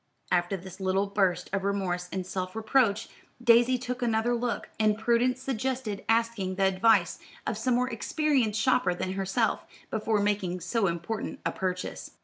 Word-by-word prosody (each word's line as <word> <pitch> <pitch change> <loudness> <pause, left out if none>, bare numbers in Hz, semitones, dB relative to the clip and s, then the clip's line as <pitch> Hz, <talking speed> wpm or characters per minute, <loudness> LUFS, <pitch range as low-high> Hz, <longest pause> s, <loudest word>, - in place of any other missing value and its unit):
After 175 +2 +1
this 190 +1 -11
little 190 +1 +1
burst 190 -3 +1
of 195 -1 0
remorse 185 -3 -1
and 185 -1 -3
self 185 0 -4
reproach, 225 -1 +2 0.3
Daisy 240 +1 +5
took 250 0 -5
another 235 0 +1
look; 240 0 -2
and 215 -1 +3
prudence 240 +3 +2
suggested 255 -4 -2
asking 225 -5 +1
the 195 - 0
advice 190 +4 +3 0.3
of - - -1
some 255 -2 +1
more 250 +1 +2
experienced 255 -2 0
shopper 230 -6 +2
than 185 +1 -3
herself, 195 +4 0 0.3
before 220 -1 0
making 200 -3 0
so 195 +4 0
important 170 +6 -3
a - - +1
purchase. 185 -1 -4
215 Hz, 155 wpm, -28 LUFS, 190-235 Hz, 0.3 s, Daisy